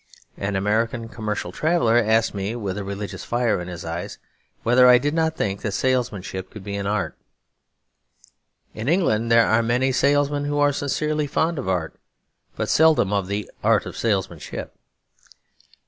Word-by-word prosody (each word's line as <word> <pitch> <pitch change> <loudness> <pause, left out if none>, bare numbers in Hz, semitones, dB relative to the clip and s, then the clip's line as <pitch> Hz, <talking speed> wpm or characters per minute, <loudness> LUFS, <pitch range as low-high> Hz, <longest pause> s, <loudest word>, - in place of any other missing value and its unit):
An 100 0 -3
American 115 +4 0
commercial 105 -5 -4
traveller 140 - +2
asked 115 -1 +3
me, 100 +3 -3
with 100 -5 -3
a 105 - -4
religious 100 +1 -6
fire 120 -5 0
in 90 - -7
his 85 -2 -7
eyes, 85 +1 -5 0.5
whether 125 +2 +5
I 125 - +8
did 145 +4 -1
not 160 -1 0
think 100 0 -2
that 105 - -3
salesmanship 105 -7 -1
could 105 - -11
be 100 0 -5
an 100 0 -3
art. 105 +1 -1 1.6
In 110 +5 -3
England 115 - +1
there 115 0 +6
are 110 +1 +3
many 125 +3 +1
salesmen 145 +2 +2
who 145 0 -1
are 145 0 +3
sincerely 150 +2 -1
fond 160 +2 0
of 125 - -3
art; 90 -4 -1 0.6
but - - -2
seldom 155 -11 +4
of 100 -2 0
the 100 0 -3 0.2
art - - +3
of - - -7
salesmanship. 100 -5 -3
115 Hz, 165 wpm, -23 LUFS, 100-140 Hz, 1.6 s, I